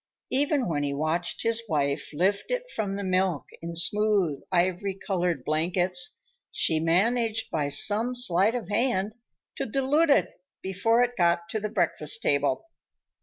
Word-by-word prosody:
Even 280 0 +1
when 150 -4 -1
he 140 -1 -2
watched 160 +4 -1
his 230 0 +1
wife 140 -3 -1
lift 190 +6 0
it - - -1
from 205 -3 -2
the 200 0 -4
milk 185 -4 0 0.2
in 170 0 -6
smooth, 190 -3 +1
ivory 185 +2 0
colored 180 -8 -2
blankets, 175 +3 0 0.3
she 160 - +2
managed, 225 +7 +1
by 150 -3 -1
some 215 - +3
sleight 215 -2 +3
of 230 -7 -4
hand, 210 -1 0 0.4
to - - -2
dilute 275 +7 +1
it 280 - +2 0.2
before 225 +6 +2
it 245 0 -2
got 170 -2 +1
to 220 - -2
the 215 0 -3
breakfast 190 -3 -1
table. 140 - +1
190 Hz, 150 wpm, -26 LUFS, 170-225 Hz, 0.4 s, some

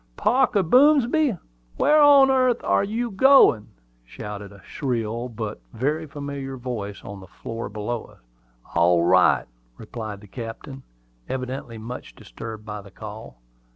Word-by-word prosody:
"Parker 245 -4 +2
Boomsby! 275 - +4 0.4
where 305 0 +4
on 280 -2 +7
earth 255 -2 +2
air - - +2
you 225 +4 -2
goin'?" 195 - +5 0.4
shouted 100 +9 -8
a 100 -3 -16
shrill, 120 -2 -3
but 110 -2 -6
very 150 +7 -1
familiar 140 -2 -6
voice 115 -5 -6
on 100 0 -8
the 95 - -13
floor 115 0 -7
below 110 +2 -4
us. - - -19 0.5
"All 85 0 +3
right," 90 +1 +4 0.3
replied 110 -2 -7
the 105 - -14
captain, 120 +5 -8 0.5
evidently 130 -2 -5
much 110 - -8
disturbed 110 -1 -9
by 105 -1 -6
the 100 - -14
call. 105 - -10
120 Hz, 135 wpm, -23 LUFS, -, 0.5 s, on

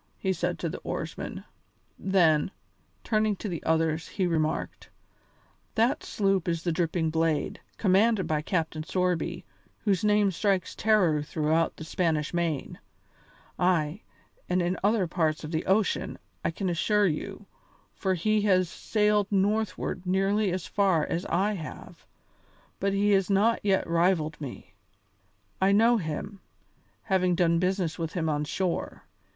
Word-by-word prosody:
he 190 -1 0
said 175 -1 -2
to 170 - -3
the 165 - -5
oarsmen. - - -5 0.6
Then, 170 -6 +3 0.5
turning 215 -1 +1
to 210 - -6
the 170 -5 -4
others, 160 0 +1
he 190 - -1
remarked: 160 -3 -2 0.9
"That 230 +3 +2
sloop 195 -4 0
is 165 -1 -1
the 175 - 0
Dripping 165 -1 0
Blade, 160 -1 0 0.2
commanded 205 +1 +3
by 155 -1 0
Captain 160 -1 -2
Sorby, 180 +2 -1 0.4
whose 200 -4 +1
name 210 -1 +3
strikes 190 0 0
terror 185 -8 +3
throughout 155 +2 0
the - - -7
Spanish 160 -2 -1
Main. 170 -5 -2 0.8
Ay! 175 0 +1 0.5
and 180 +1 +2
in 175 +1 0
other 205 -1 +3
parts 160 -2 -1
of 155 - -6
the 160 0 -2
ocean, 195 0 +1 0.3
I - - +1
can 190 +4 -3
assure 205 +4 +2
you, 195 +4 -3 0.5
for 190 -2 -1
he 215 +5 +1
has 185 -4 +3
sailed 210 0 +1
northward 195 -2 0
nearly 195 +2 +2
as 180 -1 -3
far 190 -6 +2
as 170 - -3
I 195 +5 +1
have, 165 -6 -9 0.7
but 200 +1 +1
he 200 +1 +2
has 195 -1 +3
not 210 +4 +3
yet 195 -2 +2
rivalled 165 -2 +1
me. 125 -9 -8 0.9
I 190 +1 +4
know 230 +4 +5
him, 195 +3 -5 0.6
having 185 -4 +2
done 170 -1 +3
business 180 -2 -1
with 165 -1 -3
him 160 -3 -1
on 150 0 0
shore. 180 +3 -3
180 Hz, 145 wpm, -27 LUFS, 165-200 Hz, 0.9 s, know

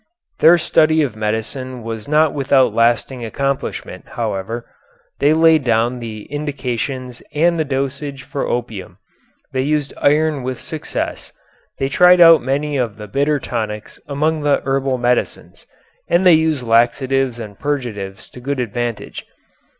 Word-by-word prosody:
Their 170 +2 +7
study 155 -1 +3
of 130 -7 -3
medicine 110 +4 -4
was 110 -1 -6
not 155 +1 +3
without 135 -2 +2
lasting 120 +2 +1
accomplishment, 135 +4 -3
however. 115 +1 -4 0.5
They 145 - +4
laid 160 -1 +4
down 120 +1 +1
the 110 -3 -7
indications 130 -3 -4
and 170 +2 +2
the - - +2
dosage 140 0 -3
for 140 -1 -4
opium. 115 -5 -4 0.6
They 130 - 0
used 145 +1 -1
iron 150 0 +2
with 125 0 -4
success, 160 -2 -5 0.5
they 135 - -1
tried 180 +6 +5
out 165 -3 +8
many 140 +3 -1
of 115 -5 -2
the 105 -1 -8
bitter 145 +6 0
tonics 110 -4 -5
among 155 +2 0
the 145 -1 +1
herbal 135 -1 0
medicines, 125 0 -2 0.4
and 175 +2 +2
they 180 - +8
used 160 -4 +2
laxatives 125 +2 +2
and 105 -4 -9
purgatives 105 -10 -4
to - - -12
good 135 +2 -3
advantage. 120 -1 -4
135 Hz, 140 wpm, -18 LUFS, 120-150 Hz, 0.6 s, out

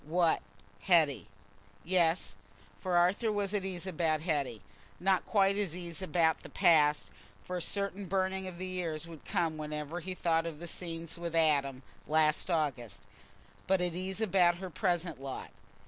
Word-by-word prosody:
What—Hetty? 160 - +1 0.6
Yes; 175 -1 +1 0.4
for 180 -2 0
Arthur 195 +6 +3
was 205 -1 -1
at 205 -2 0
ease 185 -2 -4
about 160 -4 0
Hetty—not 150 - -2
quite 200 -1 +3
at 185 -5 -1
ease 175 0 -4
about 170 -4 +2
the - - -11
past, 155 -5 +4 0.3
for 180 - -5
a - - -3
certain 200 +1 -2
burning 190 0 -1
of 180 -2 -8
the 185 +1 -5
ears 165 -3 -3
would 165 -3 -12
come 165 -2 0
whenever 150 +2 -4
he 185 +2 -6
thought 165 -2 +1
of 160 -3 -6
the 170 - -8
scenes 165 -1 -5
with 170 -1 -4
Adam 140 -5 +2 0.2
last 155 +2 +2
August, 125 - -1 0.6
but 190 0 +3
at 180 -1 0
ease 185 +2 -3
about 185 -5 +4
her 185 +1 -7
present 175 - -1
lot. 135 -1 -6
170 Hz, 155 wpm, -32 LUFS, 155-185 Hz, 0.6 s, past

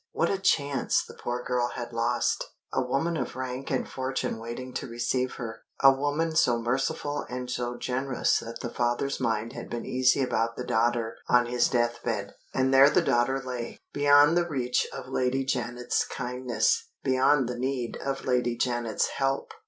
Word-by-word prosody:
What 165 - +1
a 195 - -1
chance 145 -7 +1
the - - -12
poor 120 0 -4
girl 125 -1 0
had 120 -1 -6
lost! 115 +1 +1 0.3
A - - +2
woman 135 +7 0
of 155 - -3
rank 130 +1 -4
and 130 - -1
fortune 130 -3 -3
waiting 120 +3 -6
to - - -4
receive 125 +2 -1
her 115 -3 -6 0.2
a 135 - +10
woman 145 +4 -1
so 120 -7 +4
merciful 135 +5 -1
and 125 0 -4
so 120 0 -3
generous 130 +1 0
that 115 0 -7
the 120 - -4
father's 120 +3 0
mind 115 -2 -1
had - - -7
been 120 - -4
easy 130 +1 +3
about 115 -2 0
the 125 - -4
daughter 115 0 0
on 125 0 +5
his 120 0 +2
deathbed 120 -4 -1 0.2
and 130 0 +1
there 135 +1 +8
the 175 - +3
daughter 130 0 +2
lay, 125 -2 -5 0.2
beyond 145 +2 +6
the 175 0 +2
reach 125 -4 0
of - - -7
Lady 130 0 0
Janet's 125 -1 -1
kindness, 130 - -1 0.2
beyond 130 0 +3
the 120 0 -4
need 130 -2 -2
of 135 0 -4
Lady 125 -2 +1
Janet's 120 -3 0
help! 135 - -1
125 Hz, 175 wpm, -27 LUFS, 120-135 Hz, 0.3 s, a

